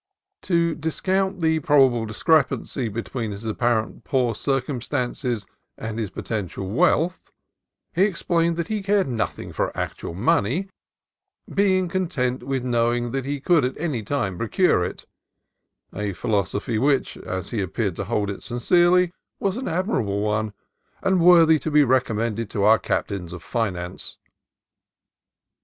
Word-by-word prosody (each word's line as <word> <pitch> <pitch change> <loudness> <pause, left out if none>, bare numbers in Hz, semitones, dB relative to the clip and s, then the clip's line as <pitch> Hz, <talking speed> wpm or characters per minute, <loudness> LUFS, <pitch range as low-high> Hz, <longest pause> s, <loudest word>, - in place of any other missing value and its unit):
To 170 -2 +1
discount 190 +5 -1
the 160 0 +2
pal 145 -2 +5
pable 120 -3 -2
discrepancy 135 +1 +1
between 115 +1 -4
his 100 +2 -7
apparently 110 0 0
poor 125 -4 +1
cir 135 +5 0
cumstances 125 -3 -3 0.3
and 110 0 -5
his 110 -4 -2
potential 95 -1 -4
wealth, 165 - +1 0.6
he 175 - 0
explained 170 -3 +1
that 170 0 -2
he 215 -1 -2
cared 195 -2 +2
nothing 120 -4 -3
for - - -1
actual 85 - -4
money, 125 - +1 0.8
being 190 -2 +3
con 185 +1 -1
tent 125 -6 -1
with 135 -2 -2
knowing 120 -1 +1
that 135 0 -2
he 140 +1 -2
could 165 +1 +3
at 130 +1 -2
any 150 -8 -2
time 105 -6 -2
procure 115 - +2
it: 90 - -5 0.9
a 105 0 -3
philosophy 105 +2 -1
which, 135 +2 +1
as 95 0 -5
he 115 -4 -1
appeared 95 0 -2
to 100 - -3
hold 105 -1 -1
it 100 - -7
sincerely, 175 +8 +3 0.3
was 195 -1 0
an 260 +2 -4
admirable 160 - 0
one, 105 0 0 0.5
and 190 -1 +3
worthy 165 -2 +7
to 160 - -3
be 150 -1 +5
recommended 115 -4 0
to 100 - -1
our 110 +2 +6
captains 90 -4 -2
of 90 -3 -8
finance. 90 -2 -3
125 Hz, 145 wpm, -23 LUFS, 110-165 Hz, 0.9 s, worthy